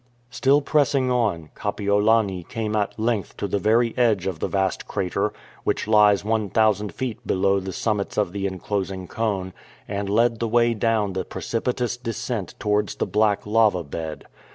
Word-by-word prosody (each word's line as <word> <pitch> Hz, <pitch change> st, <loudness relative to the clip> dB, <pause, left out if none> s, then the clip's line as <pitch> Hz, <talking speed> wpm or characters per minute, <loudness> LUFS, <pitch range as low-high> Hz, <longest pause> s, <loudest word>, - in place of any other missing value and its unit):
Still 140 Hz, +3 st, +3 dB
pressing 140 Hz, -4 st, +2 dB
on, 100 Hz, -11 st, 0 dB
Kapiolani 105 Hz, -1 st, +1 dB
came 110 Hz, -2 st, -2 dB
at 105 Hz, -1 st, -1 dB
length 110 Hz, -2 st, -1 dB
to 100 Hz, -, -2 dB
the 100 Hz, +1 st, -1 dB
very 115 Hz, +4 st, +2 dB
edge 110 Hz, -7 st, +2 dB
of 95 Hz, -4 st, -3 dB
the -, -, -1 dB
vast 95 Hz, -1 st, -1 dB
crater, 90 Hz, -2 st, -1 dB, 0.3 s
which -, -, -1 dB
lies 105 Hz, -2 st, +5 dB
one 110 Hz, -2 st, 0 dB
thousand 105 Hz, -2 st, +2 dB
feet 120 Hz, +3 st, -4 dB
below 95 Hz, +1 st, +2 dB
the 95 Hz, 0 st, -5 dB
summits 105 Hz, 0 st, -2 dB
of 105 Hz, -4 st, +1 dB
the 100 Hz, 0 st, -2 dB
enclosing 95 Hz, 0 st, -3 dB
cone, 100 Hz, -4 st, -2 dB, 0.3 s
and 100 Hz, 0 st, -3 dB
led 115 Hz, +2 st, +2 dB
the 115 Hz, -, 0 dB
way 120 Hz, +1 st, +3 dB
down 110 Hz, -3 st, 0 dB
the 95 Hz, -, -2 dB
precipitous 120 Hz, +1 st, -2 dB
descent 115 Hz, -4 st, -4 dB
towards 105 Hz, -1 st, 0 dB
the -, -, -1 dB
black 105 Hz, -1 st, +1 dB
lava 105 Hz, -4 st, +3 dB
bed. 80 Hz, +1 st, -6 dB
105 Hz, 165 wpm, -23 LUFS, 95-115 Hz, 0.3 s, lies